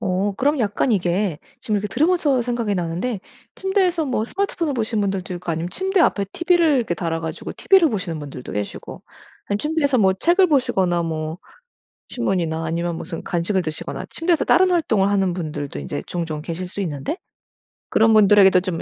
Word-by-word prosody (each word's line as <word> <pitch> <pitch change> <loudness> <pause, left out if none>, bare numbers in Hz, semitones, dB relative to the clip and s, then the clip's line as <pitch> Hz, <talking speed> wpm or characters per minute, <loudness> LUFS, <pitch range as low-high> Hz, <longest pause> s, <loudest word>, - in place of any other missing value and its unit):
어. 195 0 0
그럼 290 +2 +1
약간 220 +2 +1
이게 180 -2 0 0.2
지금 215 - -1
이렇게 205 +1 -2
들으면서 300 - +2
생각이 235 -4 -1
나는데 180 +6 -2 0.3
침대에서 375 -4 +1
뭐 250 -5 -1
스마트폰을 335 -2 -2
보시는 220 -2 -1
분들도 195 -2 -2
있고 175 -1 -5
아니면 165 +2 -3
침대 380 - 0
앞에 200 -11 +3
TV를 340 -4 +3
이렇게 230 -8 0
달아 165 -1 -2
가지고 160 -1 -5
TV를 380 -4 +4
보시는 180 - -3
분들도 140 -4 -8
계시고 105 0 -6 0.4
아니면 205 0 -1
침대에서 300 -2 +1
뭐 190 -2 +4
책을 350 - +3
보시거나 190 - +2
뭐 160 0 -4 0.7
신문이나 170 -9 -1
아니면 170 +1 -2
무슨 165 - -6
간식을 180 +2 -1
드시거나 155 -1 -5
침대에서 335 -1 +1
다른 370 +1 +4
활동을 215 - +2
하는 195 -3 +1
분들도 150 - -5
인제 70 +1 -5
종종 165 -3 -4
계실 175 +2 -5
수 200 - -6
있는데 150 - -3 0.7
그런 225 0 +4
분들에게도 200 -3 +6
좀 180 -3 -3
200 Hz, 425 characters per minute, -21 LUFS, 170-275 Hz, 0.7 s, 분들에게도